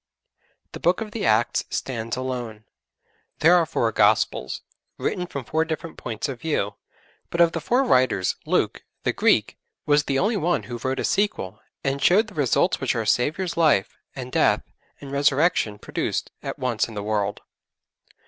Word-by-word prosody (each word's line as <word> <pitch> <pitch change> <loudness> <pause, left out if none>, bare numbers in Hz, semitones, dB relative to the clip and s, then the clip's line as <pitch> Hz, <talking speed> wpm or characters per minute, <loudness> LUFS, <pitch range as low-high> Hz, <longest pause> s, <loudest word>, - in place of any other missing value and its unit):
The - - -8
Book 175 +1 +2
of 220 -2 -5
the 215 - -2
Acts 110 +2 +2
stands 115 -3 -3
alone. 120 -4 -4 0.7
There 165 +4 +5
are 170 -2 +3
four 115 -6 0
Gospels - - +2 0.4
written 180 0 -2
from 140 -5 -5
four 160 +5 +1
different 160 0 -5
points 115 +2 -4
of 130 -4 -6
view, 120 -10 -1 0.6
but 170 - -4
of 170 -1 +6
the 165 - -3
four 245 - +2
writers, 125 - +2
Luke, - - 0 0.2
the - - +1
Greek, - - +2 0.3
was 145 0 +3
the 135 - 0
only 210 +8 +1
one 165 - 0
who 120 +2 -6
wrote 130 +2 -2
a - - -1
sequel 200 - -1 0.2
and 135 0 -1
showed 190 +9 +5
the - - -14
results 145 -7 +1
which - - 0
our - - -1
Saviour's 165 +8 +1
Life, 155 -12 +2 0.2
and 130 -2 -6
Death, - - +3 0.4
and 140 - -9
Resurrection 140 -5 +2
produced - - -3
at - - -5
once 125 -4 0
in 115 - -10
the 105 - -4
world. 105 -1 -1
135 Hz, 170 wpm, -24 LUFS, 115-165 Hz, 0.7 s, of